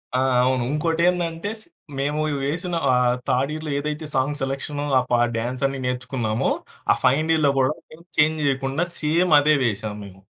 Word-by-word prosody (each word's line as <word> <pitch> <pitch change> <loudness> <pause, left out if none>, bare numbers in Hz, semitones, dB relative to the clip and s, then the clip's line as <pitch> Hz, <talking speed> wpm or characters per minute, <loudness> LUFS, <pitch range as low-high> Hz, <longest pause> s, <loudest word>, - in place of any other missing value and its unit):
ఆ! - - +3 0.2
అవును. 130 -1 +1
ఇంకోటేందంటే 170 +3 0
స్ - - -1 0.4
మేము 145 +2 0 0.2
వేసిన 170 +5 -2 0.2
ఆహ్, 125 -1 +3
థర్డ్ 135 +3 +1
ఇయర్‌లో 155 -1 -5
ఏదైతే 150 +2 -4
సాంగ్ 135 +3 +1
సెలక్షన్, 135 +2 -3 0.2
ఆ - - +2
పా 120 - +4 0.2
డాన్స్ 125 +3 -3
అన్ని 135 0 -5
నేర్చుకున్నామో, 125 -3 -1 0.4
ఆ - - +7
ఫైనల్ 150 +5 +3
ఇయర్‌లో 155 -3 +3
కూడా 130 +2 +3 0.5
చేంజ్ 155 +1 +3
చేయకుండా 135 +4 0
సేమ్ 165 +3 +2
అదే 150 +1 +4
వేసాము 105 -1 -2
మేము. 95 -1 -14
140 Hz, 155 wpm, -23 LUFS, 130-155 Hz, 0.5 s, ఆ